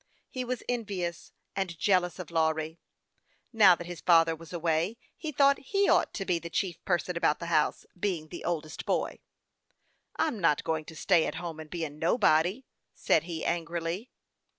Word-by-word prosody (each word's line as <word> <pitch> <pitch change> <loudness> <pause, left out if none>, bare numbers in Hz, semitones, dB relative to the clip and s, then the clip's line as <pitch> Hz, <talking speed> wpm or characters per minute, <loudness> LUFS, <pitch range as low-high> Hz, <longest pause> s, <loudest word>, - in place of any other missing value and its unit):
He 255 - -3
was 250 -1 -3
envious 195 -8 -3 0.2
and 185 -4 -2
jealous 180 -1 +2
of 180 -4 -8
Lawry. 160 0 0 0.7
Now 200 -5 +7
that 175 - -8
his 175 -1 -7
father 165 -2 +5
was 165 0 -13
away, 170 +4 0 0.2
he 315 - -5
thought 280 0 +4
he 395 +8 +1
ought - - +3
to 195 - -3
be 175 -2 +1
the 170 - -7
chief 175 -1 -2
person 180 -1 0
about 165 -3 +2
the 170 - -6
house, 155 -1 +2
being 175 -5 -2
the 175 - -8
oldest 155 -3 -3
boy. - - -1 0.5
" - - -44
I'm 305 -9 0
not 165 -5 +2
going 160 -1 -1
to 160 - -11
stay 170 0 +3
at - - -4
home, 165 -2 -5
and 155 -1 -9
be 170 -1 -3
a - - -5
nobody," 170 - +2 0.3
said - - +2
he, 165 -2 -4
angrily. 170 +6 -2
170 Hz, 180 wpm, -29 LUFS, 160-195 Hz, 0.7 s, Now